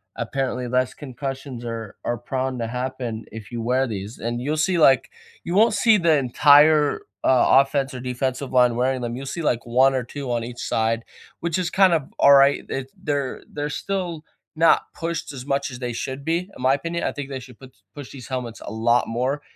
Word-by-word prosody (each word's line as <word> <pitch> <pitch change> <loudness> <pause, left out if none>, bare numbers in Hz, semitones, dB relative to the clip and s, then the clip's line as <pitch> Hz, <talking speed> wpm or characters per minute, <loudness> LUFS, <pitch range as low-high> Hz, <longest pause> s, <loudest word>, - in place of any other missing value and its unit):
apparently, 125 -2 -2
less 125 +1 +1
concussions 135 -2 -6
are 115 -3 -6
are 120 - -1
prone 130 +1 -3
to 115 - -2
happen 125 -2 -4
if 110 0 -9
you 120 -1 -4
wear 125 +3 +1
these, 105 -1 -6
and 120 +1 -3
you'll 145 +4 -1
see, 175 +4 +1
like 135 -5 +4 0.3
you 170 - -3
won't 220 +2 +5
see 215 +1 +4
the 170 -4 +3
entire, 145 +3 +5 0.2
uh, 130 -1 +4
offense 135 0 -2
or 130 - -6
defensive 130 +1 -3
line 125 -2 +4
wearing 130 +1 0
them, 120 -1 -3
you'll 135 - -6
see 170 +5 -4
like 120 -7 0
1 130 +3 +4
or 130 -1 -1
2 135 +1 -6
on 120 -1 -1
each 120 0 -9
side, 115 +1 0 0.4
which 170 0 -1
is 180 -2 -1
kinda 175 -7 +3
alright, 140 0 +6
it 135 0 -4
they're 140 -3 -2
they're 145 0 -3
still 175 -1 -3 0.3
not 165 +1 +4
pushed 165 -3 -4
as 130 -2 -8
much 140 0 -1
as 125 - -8
they 125 -1 -3
should 130 +4 -5
be, 170 +5 -1
in - - -10
my 130 +1 +4
opinion. 165 +4 -4
I - - 0
think 145 0 -6
they 135 -1 -4
should 125 -2 -14
puts 130 -1 -13 0.2
push 145 -3 -9
these 130 -4 -10
helmets 125 -3 -5
a - - -7
lot 115 +2 +2
more, 130 +5 -1
130 Hz, 205 wpm, -23 LUFS, 120-145 Hz, 0.4 s, alright